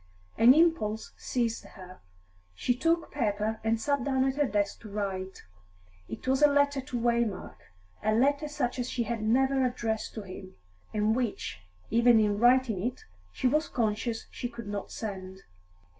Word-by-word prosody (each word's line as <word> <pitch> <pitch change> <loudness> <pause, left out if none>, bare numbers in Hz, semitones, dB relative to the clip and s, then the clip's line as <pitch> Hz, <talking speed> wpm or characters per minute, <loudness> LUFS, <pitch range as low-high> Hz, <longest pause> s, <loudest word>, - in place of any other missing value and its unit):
An 245 +4 +7
impulse 305 -10 +2
seized 235 -3 -2
her; 185 -2 -13 0.5
she 245 - 0
took 330 +5 +1
paper 215 0 -1
and 225 0 +1
sat 280 +1 0
down 265 -1 +1
at 265 0 0
her 290 -1 +2
desk 205 -3 -1
to 215 - -10
write. 190 -2 -4 0.6
It 110 - -8
was 265 +2 +2
a 295 - +8
letter 285 -1 +2
to 255 -2 -4
Waymark, 235 -4 0 0.4
a 215 - +1
letter 285 +5 +2
such 260 -4 -2
as 245 +1 -2
she 240 - -1
had 230 -1 -3
never 265 +4 +2
addressed 235 -3 -2
to 215 - -5
him, 185 0 -10 0.4
and 215 +1 +1
which, 240 - -3 0.3
even 235 0 +5
in 205 -1 +1
writing 240 -4 +4
it, 245 +5 -3 0.3
she - - -5
was 300 +5 +2
conscious 225 0 -1
she 245 - -4
could 235 -1 -9
not 205 -1 -5
send. 190 -3 -6
235 Hz, 165 wpm, -29 LUFS, 210-260 Hz, 0.6 s, a